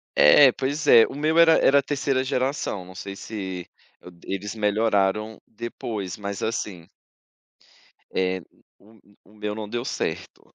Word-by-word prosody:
É, 130 - +7
pois 140 +4 -3
é. 115 -1 +8
O - - -9
meu 155 +3 0
era 165 -1 +7
era 140 +1 +4
3ª 135 -2 -1
geração, 130 -7 -2
não 95 0 -13
sei 100 0 -7
se 95 -4 -6 0.3
o 90 - -12
d 85 - -20
eles 100 +3 -5
melhoraram 105 0 0
depois, 110 -4 -6
mas 100 -1 -5
assim 100 -6 -4 1.2
eh, 95 0 -1 0.4
o 110 +2 -21 0.3
o 105 - -21
meu 105 0 -4
não 110 -1 -6
deu 120 +2 -4
certo. - - -5
105 Hz, 150 wpm, -24 LUFS, 95-130 Hz, 1.2 s, é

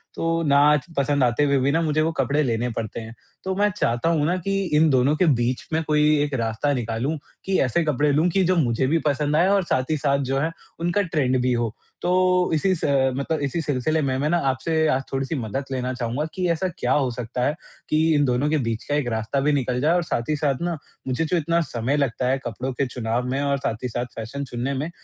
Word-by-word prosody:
तो 165 0 0
ना 140 -2 +4 0.2
च 150 +4 -10
पसंद 140 0 +2
आते 120 +3 +2
हुए 140 -1 +3
भी 135 +2 +2
ना, 165 +3 +2
मुझे 155 -1 +1
वो 160 +1 +1
कपड़े 140 0 0
लेने 120 -1 0
पड़ते 110 0 -4
हैं। 115 0 -8 0.3
तो 190 - -2
मैं 205 +2 +3
चाहता 120 - +1
हूँ 155 -3 +2
ना 175 +4 +1
कि 195 - 0 0.2
इन 160 +1 +5
दोनों 135 +2 +3
के 180 - +2
बीच 120 +1 -1
में 160 - +2
कोई 150 0 +3
भी 150 0 +4
एक 145 -1 -3
रास्ता 115 +5 0
निकालूँ, 120 +4 -2 0.3
कि 190 0 +1
ऐसे 135 +7 +1
कपड़े 150 -1 +1
लूँ 155 +5 +3
कि 190 +2 +2
जो 185 +1 +2
मुझे 130 -5 +1
भी 165 +4 +2
पसंद 145 0 +1
आएँ 170 +4 +4
और 200 -1 +3
साथ 130 -6 0
ही 155 - +1
साथ 140 -1 +1
जो 135 - +1
है, 160 +4 0 0.3
उनका 175 +4 +1
ट्रेंड 150 -8 0
भी 125 0 +1
हो। 120 -2 -1 0.3
तो, 180 0 +2
इसी 175 +5 +2
स 165 - -9
अ, 135 -2 +2
मतलब 145 +4 -1
इसी 140 +4 -1
सिलसिले 155 +1 0
में, 130 -2 0
मैं 140 +3 0
ना 175 - +3
आपसे 160 +4 0
आज 135 -3 +1
थोड़ी-सी 135 +4 -2
मदद 125 +1 -3
लेना 130 -1 -2
चाहूँगा 125 +3 -2
कि 185 -2 -1
ऐसा 170 +3 0
क्या 125 - -1
हो 135 -3 +2
सकता 125 +1 -3
है, 145 - 0 0.3
कि 160 +1 +3
इन 145 - +3
दोनों 130 +3 +1
के 155 - +2
बीच 115 -5 -2
का 145 - -2
एक 145 -4 0
रास्ता 110 +4 -1
भी 145 +2 +2
निकल 125 -3 0
जाए 155 +4 +3
और 175 - +1
साथ 120 -6 -3
ही 155 - +2
साथ 145 -2 -1
ना, 170 -1 -1 0.3
मुझे 130 +5 0
जो 175 +3 0
इतना 170 +1 +1
समय 130 -2 -1
लगता 130 -3 0
है 135 - +2
कपड़ों 125 +4 -3
के 135 +2 0
चुनाव 120 -1 -2
में 135 +2 -1
और 140 -1 +1
साथ 115 -3 -3
ही - - 0
साथ 120 +1 -3
फ़ैशन 115 +6 -5
चुनने 125 +1 -3
में, 140 +4 -3
140 Hz, 250 wpm, -23 LUFS, 125-160 Hz, 0.3 s, इन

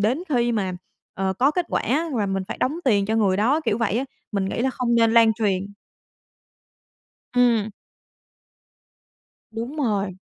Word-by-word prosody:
đến 240 - +1
khi 240 -4 +1
mà, 195 -4 -1 0.4
ờ, 190 0 -1
có 255 +9 +2
kết 350 +2 -2
quả, 315 +7 0
và 210 -3 0
mình 195 0 -2
phải - - -4
đóng 285 +6 0
tiền 200 -6 +3
cho 220 - 0
người 200 -4 +2
đó, 250 +10 +2
kiểu 305 - -1
vậy 230 0 0
á. 265 - -1 0.3
Mình 200 -1 0
nghĩ 190 - -3
là 265 +2 +1
không 245 -2 -1
nên 230 -1 +4
lan 230 -1 +6
truyền. 200 -4 -1 1.7
Ừm. 235 -4 +3 1.8
Đúng 230 +7 -6
rồi. 205 -9 -1
225 Hz, 165 wpm, -23 LUFS, 200-250 Hz, 1.8 s, lan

